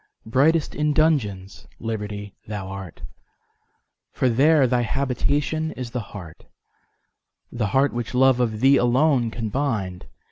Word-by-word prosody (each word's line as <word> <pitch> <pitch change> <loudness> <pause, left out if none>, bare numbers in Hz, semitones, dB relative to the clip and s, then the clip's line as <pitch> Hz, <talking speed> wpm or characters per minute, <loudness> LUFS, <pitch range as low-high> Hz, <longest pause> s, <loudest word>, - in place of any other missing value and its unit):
Brightest 145 +8 +2
in 150 0 0
dungeons, 110 -12 0
Liberty! 105 -2 -5
thou 100 -3 -5
art, 95 -3 -9 1.1
For 130 - +1
there 140 +4 +4
thy 125 -1 +1
habitation 140 +6 -1
is 125 -2 -7
the 125 - -3 1.6
heart—The 110 - +1
heart 135 +6 +2
which 120 +1 -4
love 130 0 +4
of 110 -3 -1
Thee 135 +1 +6
alone 125 0 +2
can 110 -1 -4
bind. 105 -9 -2
125 Hz, 120 wpm, -23 LUFS, 105-140 Hz, 1.6 s, Thee